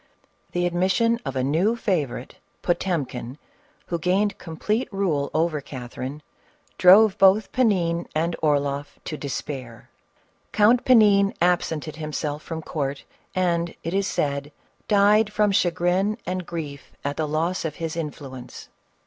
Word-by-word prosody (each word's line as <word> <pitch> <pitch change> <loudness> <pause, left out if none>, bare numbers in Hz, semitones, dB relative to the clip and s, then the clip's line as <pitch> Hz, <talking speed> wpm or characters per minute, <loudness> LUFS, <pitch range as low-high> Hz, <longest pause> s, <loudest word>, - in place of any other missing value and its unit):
The 175 0 +1
admission 190 +7 +2
of 135 - -4
a 130 - 0
new 170 - +2
favorite, 155 - -2 0.3
Potemkin, 145 -8 -2 0.5
who 170 - -3
gain 190 +5 +2
ed - - -22
complete 210 +10 -2
rule 175 -8 0
over 155 -2 0
Catherine, 130 +2 -7 0.6
drove 200 +3 +7
both 195 +2 +5
Panin 175 -9 +1
and 165 +2 0
Orloff 145 -2 0
to 155 - -4
despair. 135 -4 -6 0.6
Count 225 +4 +4
Panin 205 -5 +5
absented 165 -3 0
himself 150 -1 -3
from 160 0 -6
court, 140 -3 -3 0.3
and, 170 -2 0
it 165 - -3
is 195 0 +1
said, 140 -2 -2 0.4
died 210 +1 +4
from 210 -1 +2
chagrin 180 +3 +1
and 185 -1 -3
grief 150 -5 -7
at 145 0 -1
the 155 0 -1
loss 165 +4 -1
of 155 -2 -3
his 165 0 -4
influence. 140 -6 -7
170 Hz, 130 wpm, -24 LUFS, 145-195 Hz, 0.6 s, drove